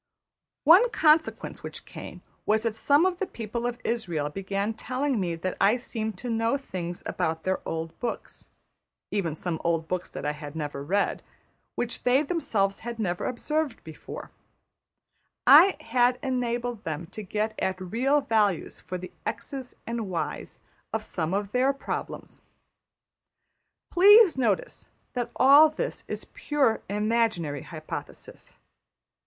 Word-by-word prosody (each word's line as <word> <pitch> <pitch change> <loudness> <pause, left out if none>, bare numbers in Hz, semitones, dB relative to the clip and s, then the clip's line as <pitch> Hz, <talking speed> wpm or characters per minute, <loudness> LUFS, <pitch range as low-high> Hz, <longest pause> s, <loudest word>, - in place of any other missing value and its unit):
One 365 - +7
consequence 315 -6 +2
which - - -8
came - - -10 0.2
was 220 +1 +3
that 230 -2 0
some 285 +9 +3
of 365 -1 0
the 390 - -1
people 235 +1 -4
of 240 0 -3
Israël 170 -11 -2
began 195 +2 -2
telling 255 +2 -1
me 175 -3 -1
that 180 +3 -3
I 205 +5 +5
seemed 220 -4 -4
to 245 - -5
know 225 +3 +1
things 175 -10 -6
about 160 0 -2
their 190 0 0
old 165 0 -4
books 240 -2 -5 0.6
(even 175 -7 -1
some 165 0 -4
old 165 -1 0
books 180 +1 -3
that - - -7
I 150 - +1
had 150 0 -8
never 145 -3 -4
read), 195 +7 0 0.5
which 240 0 -3
they 255 +4 +3
themselves 220 - 0
had 235 0 -6
never 180 -5 -1
observed 300 +1 -2
before; 160 -2 -9 1.1
I 385 -3 +8
had 250 -3 +2
enabled 245 -3 -2
them 160 +1 -4
to 215 - -6
get 215 +2 -2
at 190 0 -1
real 250 +10 +1
values 210 - +1
for 185 +2 -5
the 185 +1 -8 0.2
$x$'s 265 -3 -5
and 230 -3 -3
$y$'s; 170 -3 -4 0.3
of 220 -1 -2
some 165 -5 -3
of 200 0 -2
their 260 +3 +3
problems. 275 - -6 1.5
Please 405 +1 +8
notice 230 -7 -1 0.2
that 245 -2 -2
all 285 +4 +8
this - - -4
is - - -5
pure 275 -6 0
imaginary 210 - 0
hypothesis. 155 -2 -9
220 Hz, 140 wpm, -27 LUFS, 180-260 Hz, 1.5 s, I